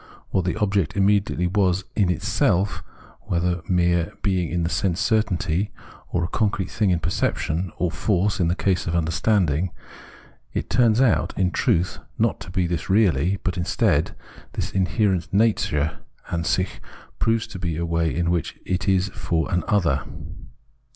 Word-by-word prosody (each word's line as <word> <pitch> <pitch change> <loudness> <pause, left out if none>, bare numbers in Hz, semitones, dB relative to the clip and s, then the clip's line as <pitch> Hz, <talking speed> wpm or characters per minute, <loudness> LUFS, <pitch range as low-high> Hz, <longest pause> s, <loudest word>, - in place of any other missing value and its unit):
What 95 -2 +1
the 90 - 0
object 100 -5 0
immediately 100 -2 +2
was 95 0 +1
in 100 -4 +2
itself 95 +2 +1 0.2
— - - -24
whether 90 -1 0
mere 85 -2 +2
being 95 -5 +1
in 85 0 0
sense 85 +1 0
certainty, 105 -4 +1 0.4
a 85 -1 0
concrete 100 -1 -1
thing 105 -3 +1
in 90 - +3
perception, 85 +1 -1
or 90 -2 0
force 100 +1 0
in 85 - +2
the 85 - +1
case 95 -3 0
of 85 - 0
understanding 85 0 +1 0.4
— - - -25
it - - -3
turns 115 -2 +4
out, 130 -6 +2
in 90 -2 +2
truth, 85 +2 +1 0.2
not - - +1
to - - -9
be 90 0 0
this 85 -4 -3
really; 95 -3 +3
but 95 -1 -1
instead, 85 - +1 0.4
this - - -3
inherent 95 -1 +1
nature 100 -8 +1 0.3
(AnsicJi) 85 +2 -1 0.4
proves 115 0 +1
to 95 - -9
be 85 -3 -2
a 85 - -1
way 85 -1 0
in 85 0 0
which 85 -3 -2
it 95 +2 -2
is 95 0 +2
for 85 -1 -2
an 90 - +1
other. 85 -10 +2
90 Hz, 155 wpm, -23 LUFS, 85-100 Hz, 0.4 s, turns